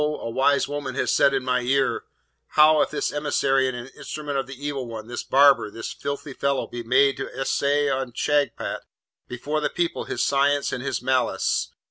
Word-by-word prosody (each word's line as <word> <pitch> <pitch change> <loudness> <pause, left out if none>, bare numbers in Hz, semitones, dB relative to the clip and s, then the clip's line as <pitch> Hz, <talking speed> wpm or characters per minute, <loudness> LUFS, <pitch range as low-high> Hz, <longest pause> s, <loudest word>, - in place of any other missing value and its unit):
a 150 -5 -2
wise 140 +3 +2
woman 140 -3 -4
has - - 0
said 140 - +4
in 135 -1 -1
my 125 0 +1
ear, 135 +2 0 0.5
"How 155 0 +7
if - - +1
this 150 - -2
emissary 135 -2 +1
and 125 -1 -5
instrument 150 -2 -6
of 135 - -4
the 135 - -8
Evil 140 -4 -3
One, 110 -2 -7
this 120 +1 -5
barber, 140 -4 +4
this 115 +2 -6
filthy 140 0 -5
fellow, 140 0 -1
be 120 - -7
made 130 +3 +3
to 135 - -4
essay 145 +2 +1
on 130 -3 -2
Shagpat 145 -3 -1 0.5
before 145 +5 -3
the - - 0
people 175 -1 -2
his - - -2
science 140 +1 +1
and 125 - -3
his 140 - -3
malice? 130 -2 0
135 Hz, 185 wpm, -24 LUFS, 130-145 Hz, 0.5 s, How